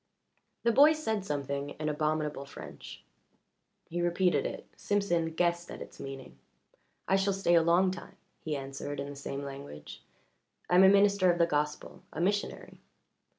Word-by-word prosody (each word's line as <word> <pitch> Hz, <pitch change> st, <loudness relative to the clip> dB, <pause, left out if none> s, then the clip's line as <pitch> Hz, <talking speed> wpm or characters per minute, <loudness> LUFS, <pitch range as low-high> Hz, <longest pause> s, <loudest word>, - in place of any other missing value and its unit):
The 235 Hz, -, +4 dB
boy 290 Hz, +6 st, +7 dB
said 220 Hz, -10 st, -2 dB
something 140 Hz, -3 st, -3 dB
in 155 Hz, -, -2 dB
abominable 150 Hz, -1 st, -1 dB
French. 140 Hz, -, -10 dB, 0.8 s
He 175 Hz, +1 st, -3 dB
repeated 175 Hz, +1 st, +2 dB
it -, -, -7 dB
Simpson 175 Hz, -5 st, 0 dB
guessed 175 Hz, 0 st, 0 dB
at -, -, -8 dB
its -, -, -10 dB
meaning. 135 Hz, -1 st, -8 dB, 0.7 s
"I 195 Hz, -, +3 dB
shall 195 Hz, +1 st, +1 dB
stay 190 Hz, -3 st, +1 dB
a 170 Hz, -, +6 dB
long 175 Hz, +3 st, +3 dB
time," 180 Hz, -, -9 dB, 0.2 s
he 155 Hz, -2 st, -3 dB
answered 135 Hz, +1 st, -5 dB
in 140 Hz, +1 st, -4 dB
the -, -, -9 dB
same 140 Hz, 0 st, -5 dB
language. 135 Hz, -, -9 dB, 0.7 s
"I -, -, -2 dB
am 180 Hz, +1 st, +7 dB
a 190 Hz, -, +9 dB
minister 200 Hz, -2 st, +5 dB
of 175 Hz, -, -1 dB
the 170 Hz, -, +4 dB
gospel 150 Hz, -1 st, -2 dB
a -, -, -6 dB
missionary." 200 Hz, +4 st, -2 dB
170 Hz, 160 wpm, -30 LUFS, 145-190 Hz, 0.8 s, a